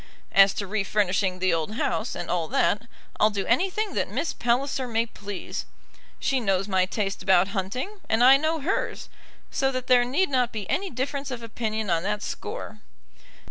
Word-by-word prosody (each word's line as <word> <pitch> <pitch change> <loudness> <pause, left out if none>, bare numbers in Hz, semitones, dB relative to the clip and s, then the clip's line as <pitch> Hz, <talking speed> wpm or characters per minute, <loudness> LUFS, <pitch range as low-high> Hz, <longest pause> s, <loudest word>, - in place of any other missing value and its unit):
As 195 0 +6
to 200 - -3
refurnishing 195 -2 0
the 185 -1 +2
old 165 +6 -2
house, 225 0 -1
and 175 - -5
all 170 -2 -1
that, 205 +9 +1 0.3
I'll 215 - +5
do 200 -2 -3
anything 380 - +1
that - - -1
Miss 280 - -2
Palliser 255 +2 0
may 230 -1 +1
please. 205 -3 -6 0.5
She 270 -1 +1
knows 195 -4 0
my 190 -2 +2
taste 200 -1 -2
about 190 0 +4
hunting, 220 - -3
and 225 +2 +3
I 260 +2 +9
know 315 +2 0
hers, 355 +8 -2 0.4
so 270 0 +1
that 255 -1 -3
there 250 -1 +5
need 280 +10 +1
not 250 -3 +1
be 210 -4 -5
any 390 +1 0
difference 275 +2 -3
of 245 -3 -5
opinion 220 -3 -3
on 165 -1 +2
that 210 +3 -2
score. 215 - -6
220 Hz, 180 wpm, -26 LUFS, 195-260 Hz, 0.5 s, I